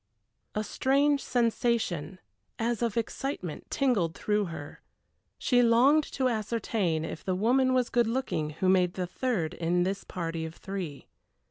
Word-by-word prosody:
A 215 - 0
strange 280 +5 +2
sensation, 230 - 0 0.4
as 235 0 -1
of 235 -2 0
excitement, 230 - -3
tingled 210 -12 +1
through 210 -1 0
her. 160 -4 -8 0.6
She 245 -1 +3
longed 255 +6 +5
to 260 -2 +1
ascertain 215 -7 -1
if 160 - -6
the 185 - 0
woman 255 +6 +3
was 250 -2 +1
good 240 -2 +3
looking 230 -11 -1
who 160 +5 -2
made 185 -1 +3
the 185 - -1
third 180 -4 -1
in 175 +1 +1
this 195 +2 -2
party 165 -2 -4
of 160 +1 -6
three. 185 -8 -6
215 Hz, 145 wpm, -29 LUFS, 175-245 Hz, 0.6 s, longed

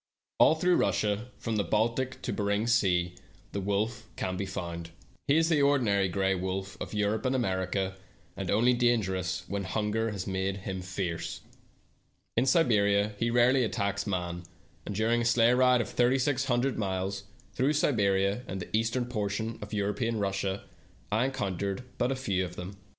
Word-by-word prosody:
All 160 - +7
through 180 +2 +3
Russia, 105 +2 0
from 115 -2 -2
the 100 - +2
Baltic 115 +7 0
to - - -2
Behring's 105 +3 +1
sea, 90 -6 +2 0.4
the 100 - -3
wolf 110 +4 -2
can 95 - -2
be 95 +1 -3
found. 85 -2 -5 0.4
He 145 +2 +4
is 165 0 +4
the 155 -3 +3
ordinary 115 -9 +3
gray 95 +1 +1
wolf 95 +1 -3
of - - -5
Europe 105 +1 0
and 130 +1 +1
America, 95 -4 -1 0.4
and 95 -2 -4
only 120 +5 +4
dangerous 95 -7 +1
when 100 0 -2
hunger 105 +4 -1
has 100 -4 -4
made 95 0 -1
him 95 -2 -3
fierce. 90 -2 -4 0.9
In 120 +3 +2
Siberia 105 -8 +3
he 115 - +1
rarely 120 +2 +4
attacks 100 -2 -1
man, 90 -3 -2 0.5
and 105 - -4
during 115 +3 +2
a - - -1
sleigh 115 0 +4
ride 125 -1 +4
of - - -4
thirty 125 +2 +3
six 135 0 +1
hundred 125 0 +1
miles 100 0 -2 0.3
through 135 +4 +2
Siberia 100 -7 +2
and 95 - -4
the 90 - -4
eastern 115 +3 +1
portion 110 -1 -3
of 105 - -8
European 110 +3 -1
Russia 100 -1 -1 0.5
I 110 +4 +2
encountered 100 -4 -2 0.2
but 130 +2 +1
few 100 -8 0
of 90 -1 -6
them. 90 +3 -7
105 Hz, 165 wpm, -29 LUFS, 95-120 Hz, 0.9 s, All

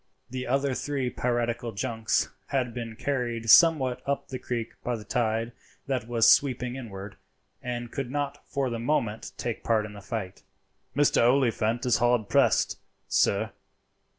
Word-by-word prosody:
The 130 0 -4
other 135 +2 +1
three 135 -2 -2
piratical 120 -1 -1
junks 110 +3 0 0.2
had 125 -4 -1
been 115 -2 -5
carried 120 -3 0
somewhat 145 -6 +6
up 140 0 -2
the 130 -2 -5
creek 115 -2 -3
by 125 - -1
the 110 - -7
tide 115 0 0 0.3
that 130 -5 -2
was 115 -2 +3
sweeping 125 -2 0
inward, 100 -6 -8 0.4
and 120 -1 -4
could 135 -3 -4
not 145 +1 -3
for 135 -3 -1
the 115 - -3
moment 115 -4 -1
take 120 -2 -4
part 110 -2 +2
in 105 - -9
the 100 - -10
fight. 100 -3 -5 0.5
"Mr. 145 +1 +4
Oliphant 120 -2 +1
is 125 - +3
hard 120 -3 +2
pressed, - - +3 0.3
sir." - - +2
120 Hz, 150 wpm, -27 LUFS, 115-130 Hz, 0.5 s, somewhat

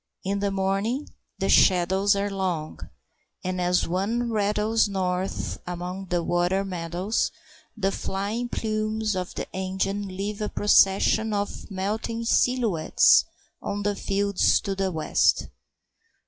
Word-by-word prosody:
In 200 +1 -1
the 200 0 0
morning 195 +8 -1 0.3
the - - -1
shadows 190 +2 +4
are 200 0 -1
long, 180 -5 -3 0.6
and, 185 0 -2
as 180 0 +2
one 220 +7 -1
rattles 210 +1 +1
north 185 -1 -2
among 180 +2 -5
the 175 -1 0
water 175 +3 +1
meadows, 180 +3 -1 0.5
the 195 -2 +1
flying 205 +6 -3
plumes 215 -1 -1
of 180 -1 -4
the - - -4
engine 190 +2 -2
leave 200 +3 -4
a 210 - -1
procession 205 +2 +3
of 205 +1 -4
melting 215 +4 -3
silhouettes 230 -10 +4 0.4
on 205 0 -3
the 205 0 0
fields 200 0 +2
to 200 - -3
the 195 -1 -1
west. 160 -2 +1
195 Hz, 125 wpm, -25 LUFS, 185-210 Hz, 0.6 s, shadows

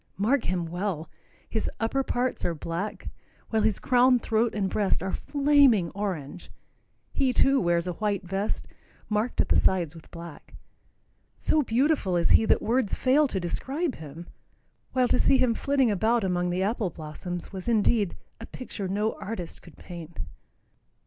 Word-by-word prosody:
Mark 230 +7 +1
him 180 -1 -1
well. 175 -2 -3 0.4
His 220 - -2
upper 230 +4 0
parts 255 -1 -1
are 170 - 0
black, 170 +7 -4 0.4
while 220 -1 +2
his 215 -2 +2
crown, 250 0 +4
throat 225 -1 0
and 200 -2 0
breast 200 -1 0
are 190 - -2
flaming 280 - +3
orange. 180 -5 -5 0.6
He, 265 -2 +2
too, 270 +2 +4
wears 170 -1 +1
a 180 - -2
white 205 +1 -1
vest, 195 +3 -3 0.4
marked 215 +3 +1
at - - -3
the - - +4
sides 175 -5 +2
with 165 -2 -14
black. 170 -2 -11 0.8
So 310 - +2
beautiful 250 - +1
is 170 - +2
he 225 - +6
that - - +2
words 235 -3 +1
fail 285 +3 +3
to 195 - -2
describe 270 - -2
him, 160 +2 -9 0.7
while 255 -1 +3
to 250 - +2
see 270 - +4
him 255 -3 +3
flitting 270 -1 +2
about 220 +3 +2
among 180 -1 0
the 180 +2 0
apple 210 -1 0
blossoms 170 +4 -6
was 190 +4 -4
indeed 215 -3 +2 0.2
"a 225 - -8
picture 210 -6 -6
no 210 +4 0
artist 200 -4 -6
could 170 - -16
paint." 170 -2 -10
205 Hz, 160 wpm, -27 LUFS, 175-245 Hz, 0.8 s, he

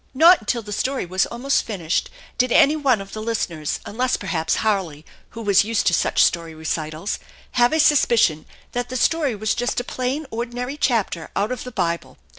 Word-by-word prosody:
Not 335 +6 +7
until 225 +2 -2
the 210 - -9
story 260 +2 -1
was 185 +2 0
almost 255 +4 0
finished 180 -6 -2 0.3
did 250 0 +2
any 290 +5 +5
one 270 -8 +2
of 195 - -11
the 215 - -5
listeners, 175 -9 -2
unless 250 +4 -1
per - - -9
haps 160 -3 0
Harley, 185 -8 -1 0.3
who 230 - -5
was 200 -2 +4
used 225 +1 0
to 175 - +3
such - - +3
story 165 -1 0
recitals, 155 +3 -3 0.3
have 240 -1 +3
a 315 - +1
sus 295 -2 +5
picion 160 -10 +2 0.3
that 245 0 -3
the 255 - -3
story 290 -2 +1
was 215 +1 -1
just 245 +1 -1
a - - -3
plain, 255 +5 -3
ordinary 245 +3 -4
chapter 220 - -1
out 205 +4 0
of 255 - -4
the 250 - -7
Bible. 170 -6 -2
225 Hz, 200 wpm, -22 LUFS, 180-250 Hz, 0.3 s, Not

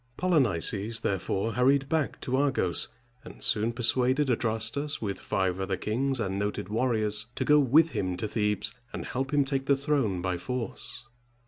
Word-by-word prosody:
Polynices 115 - +1
therefore 100 +2 -1
hurried 135 +4 +3
back 155 -1 -1
to 130 - -1
Argos, 130 - +2 0.4
and - - -11
soon 110 +2 +2
persuaded 130 +3 +2
Adrastus, 115 +6 -1
with 100 -3 -4
five 95 -1 -1
other 95 -1 -2
kings 130 +7 -1
and 95 -3 -2
noted 100 -2 -3
warriors, 110 -2 +1
to - - -2
go 150 0 +5
with 150 +4 +4
him 90 -6 -2
to 110 - -2
Thebes, 105 -2 -1 0.2
and - - -6
help 135 +2 -3
him 145 -2 +3
take 135 0 -2
the 140 - +4
throne 135 - 0
by 90 0 -2
force. 125 +3 -3
115 Hz, 160 wpm, -28 LUFS, 105-135 Hz, 0.4 s, go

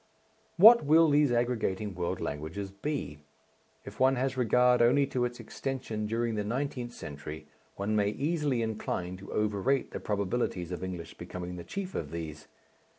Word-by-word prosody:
What 225 +6 +9
will 160 +1 +5
these 145 -2 +4
aggregating 110 -4 0
world 85 -1 -2
languages 80 +7 -4
be? 100 - -4 0.7
If - - -10
one 130 +1 +5
has 130 +1 -1
regard 125 0 +4
only 130 +4 +5
to 130 -2 -1
its 120 0 -5
extension 125 -6 -4
during 115 +1 -1
the 105 -1 -1
nineteenth 125 +2 -3
century 75 -2 -8 0.3
one 100 +2 -1
may 100 -1 +3
easily 145 0 0
incline 90 -5 -3
to 100 +1 -11
overrate 105 +6 0
the - - -4
probabilities 100 -3 -2
of 90 - -4
English 90 -3 -6
becoming 90 0 -6
the 85 - -7
chief 195 - -5
of - - -3
these. 80 -3 -6
110 Hz, 155 wpm, -30 LUFS, 95-130 Hz, 0.7 s, What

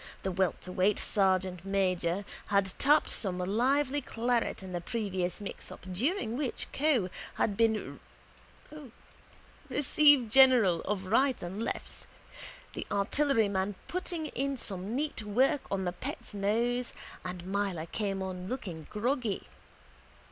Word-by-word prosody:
The 190 - -1
welterweight 185 +2 +1
sergeantmajor 190 -1 +1 0.2
had 200 -2 +2
tapped 295 +2 +4
some 190 -4 -2
lively 260 +9 +1
claret 235 -4 -1
in 190 - -7
the 175 - -2
previous 190 -3 -2
mixup 205 - -7
during 240 - 0
which 265 -2 -3
Keogh 270 - +2 0.2
had 205 - +1
been 220 0 +1 1.7
receivergeneral 260 - +5
of 195 -2 -2
rights 255 +6 +2
and 190 +5 -4
lefts, - - -3 0.7
the - - -5
artilleryman 205 -3 +1
putting 350 -3 -3
in 275 -2 -2
some 195 0 -4
neat 295 -3 -2
work 250 +7 +2
on 190 -1 -1
the 175 - -1
pet's 180 - -6
nose, 235 +5 0 0.3
and 180 -1 -5
Myler 190 -4 -1
came 195 +1 -2
on 185 -1 -5
looking 180 - -5
groggy. 235 -1 -1
205 Hz, 115 wpm, -31 LUFS, 190-255 Hz, 1.7 s, receivergeneral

